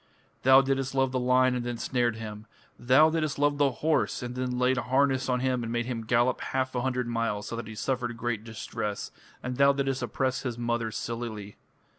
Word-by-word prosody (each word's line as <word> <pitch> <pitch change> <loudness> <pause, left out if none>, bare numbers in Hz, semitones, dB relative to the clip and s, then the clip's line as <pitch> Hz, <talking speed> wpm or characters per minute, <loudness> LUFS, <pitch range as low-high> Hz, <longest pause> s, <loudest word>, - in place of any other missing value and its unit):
Thou 130 +1 +7
didst 135 0 -1
love 135 -1 +2
the 130 - 0
lion 125 +1 +3
and 125 -1 -2
then 120 -1 -3
snared 120 -2 0
him. 110 -1 -8 0.3
Thou 135 +6 +5
didst 155 -3 -1
love 145 0 +1
the 145 -1 +4 0.2
horse, 155 -4 +1
and 120 0 -4
then 125 0 -2
laid 125 +1 +2
harness 130 +1 +1
on 125 -1 +1
him 130 -1 0
and 115 -1 -4
made 120 0 -1
him 115 -3 -4
gallop 120 +2 +2
half 130 0 -2
a 125 - -1
hundred 125 -1 -1
miles 115 -3 -2
so - - -4
that 115 -2 -5
he 110 - -8
suffered 120 0 -2
great 115 -2 -2
distress, 105 -2 -5 0.3
and 125 0 -4
thou 140 0 +5
didst 135 -1 -1
oppress 130 -1 -1
his 120 -4 -4
mother 120 -1 -1
Silili. 110 -3 -5
125 Hz, 205 wpm, -28 LUFS, 115-130 Hz, 0.3 s, Thou